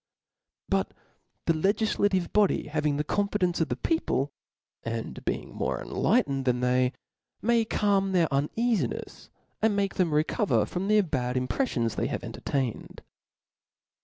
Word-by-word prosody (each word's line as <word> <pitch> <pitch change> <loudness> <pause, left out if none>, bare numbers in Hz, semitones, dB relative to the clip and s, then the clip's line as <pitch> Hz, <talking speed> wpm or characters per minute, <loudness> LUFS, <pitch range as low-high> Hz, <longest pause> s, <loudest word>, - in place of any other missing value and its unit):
But - - 0 0.5
the 165 - +3
legiflative 195 +1 +1
body 205 -7 +2
having 150 -1 0
the 150 - 0
confidence 190 0 0
of 165 - 0
the - - 0
people, 150 - 0 0.5
and 115 - -5
being - - -3
more - - -2
enlightened 135 -1 +1
than 125 -1 +1
they, 125 +1 +2 0.5
may 230 0 +2
calm 200 -3 +1
their 175 -3 +3
uneafinefs, 210 - -1 0.3
and 220 -2 +3
make 200 -1 0
them 180 -4 +2
recover 155 +8 +2
jrom 185 +2 -3
the 210 0 +5
bad 130 -8 -2
imprefiions 125 - -1
they - - +1
have - - -4
entertained. 130 -5 -3
170 Hz, 135 wpm, -27 LUFS, 135-205 Hz, 0.5 s, the